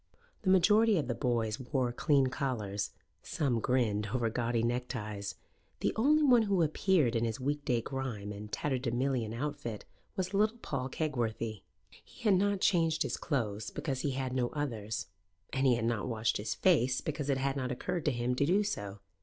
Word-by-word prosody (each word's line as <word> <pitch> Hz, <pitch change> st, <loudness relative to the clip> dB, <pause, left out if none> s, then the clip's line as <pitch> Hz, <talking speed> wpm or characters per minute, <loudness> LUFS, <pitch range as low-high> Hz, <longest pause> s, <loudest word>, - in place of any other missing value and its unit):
The 190 Hz, -, 0 dB
majority 210 Hz, +3 st, +5 dB
of 145 Hz, -6 st, -1 dB
the 120 Hz, -, 0 dB
boys 115 Hz, -4 st, 0 dB
wore 130 Hz, -1 st, -1 dB
clean 140 Hz, +2 st, +3 dB
collars; 120 Hz, -7 st, -2 dB, 0.3 s
some 130 Hz, -6 st, 0 dB
grinned 110 Hz, -4 st, +1 dB
over 115 Hz, +1 st, 0 dB
gaudy 115 Hz, 0 st, 0 dB
neckties. 115 Hz, -5 st, -3 dB, 0.5 s
The -, -, +1 dB
only 300 Hz, +7 st, +4 dB
one 250 Hz, -5 st, +6 dB
who 200 Hz, -5 st, +2 dB
appeared 155 Hz, -, +2 dB
in 115 Hz, -, +1 dB
his 115 Hz, +1 st, -2 dB
week 145 Hz, +2 st, -1 dB
day 120 Hz, -5 st, +1 dB
grime 115 Hz, -6 st, -4 dB
and 105 Hz, +1 st, -8 dB
tatterdemalion 125 Hz, -3 st, -1 dB
outfit 125 Hz, -3 st, -4 dB, 0.3 s
was 185 Hz, 0 st, -2 dB
little 215 Hz, +3 st, +2 dB
Paul 135 Hz, -, -3 dB
Kegworthy. 115 Hz, -, -2 dB, 0.4 s
He -, -, -16 dB
had 210 Hz, -3 st, +5 dB
not 200 Hz, +1 st, +2 dB
changed 165 Hz, -4 st, +3 dB
his -, -, -2 dB
clothes, 110 Hz, -8 st, -2 dB
because 135 Hz, -4 st, -3 dB
he 140 Hz, 0 st, -1 dB
had 130 Hz, -1 st, -2 dB
no 125 Hz, -2 st, +1 dB
others; 115 Hz, -8 st, -3 dB, 0.5 s
and 135 Hz, 0 st, +2 dB
he 125 Hz, -, +5 dB
had 115 Hz, -1 st, -1 dB
not 115 Hz, -1 st, 0 dB
washed 115 Hz, -2 st, 0 dB
his 105 Hz, +1 st, -3 dB
face, 130 Hz, -8 st, +3 dB
because 150 Hz, -2 st, -3 dB
it 135 Hz, -, +2 dB
had 135 Hz, +1 st, 0 dB
not 130 Hz, -2 st, -2 dB
occurred 155 Hz, +6 st, -3 dB
to 150 Hz, -, +3 dB
him 120 Hz, 0 st, -1 dB
to 140 Hz, -, +3 dB
do 195 Hz, +5 st, +4 dB
so. 100 Hz, -, -4 dB
130 Hz, 180 wpm, -32 LUFS, 115-150 Hz, 0.5 s, one